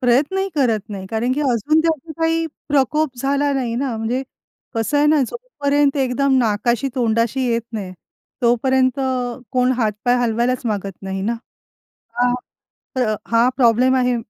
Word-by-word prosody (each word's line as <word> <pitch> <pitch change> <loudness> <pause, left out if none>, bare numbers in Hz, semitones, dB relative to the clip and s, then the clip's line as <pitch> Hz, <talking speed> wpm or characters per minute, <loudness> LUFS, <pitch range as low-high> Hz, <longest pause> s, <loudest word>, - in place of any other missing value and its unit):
प्रयत्नही 290 +11 +2
करत 240 -7 +2
नाही, 190 -2 -6
कारण 235 +3 0
की 295 - -1
अजून 280 +4 +2
त्याचा 320 -1 -1
काही 325 0 +1 0.2
प्रकोप 285 0 +1
झाला 280 +1 +1
नाही 250 -4 -1
ना. 255 -3 -1
म्हणजे 235 +4 -1 0.5
कसं 225 +6 0
आहे 295 - +4
ना, 300 -1 +4
जो - - -5 0.2
पर्यंत 285 0 +2
एकदम 265 +1 +2
नाकाशी, 235 +2 +1
तोंडाशी 235 +1 +1
येत 230 -1 0
नाही. 195 -4 -5 0.5
तोपर्यंत 255 +2 +2
अ, 250 -2 -1
कोण 255 0 +3
हातपाय 240 +1 0
हलवायलाच 245 +1 0
मागत 200 -3 -3
नाही 190 0 -4
ना 225 +4 0 0.8
हां. 245 0 +2 0.6
तर 220 -4 +1 0.2
हां 230 +2 +4
प्रॉब्लेम 250 +1 +4
आहे 250 -1 +2
250 Hz, 150 wpm, -20 LUFS, 230-275 Hz, 0.8 s, आहे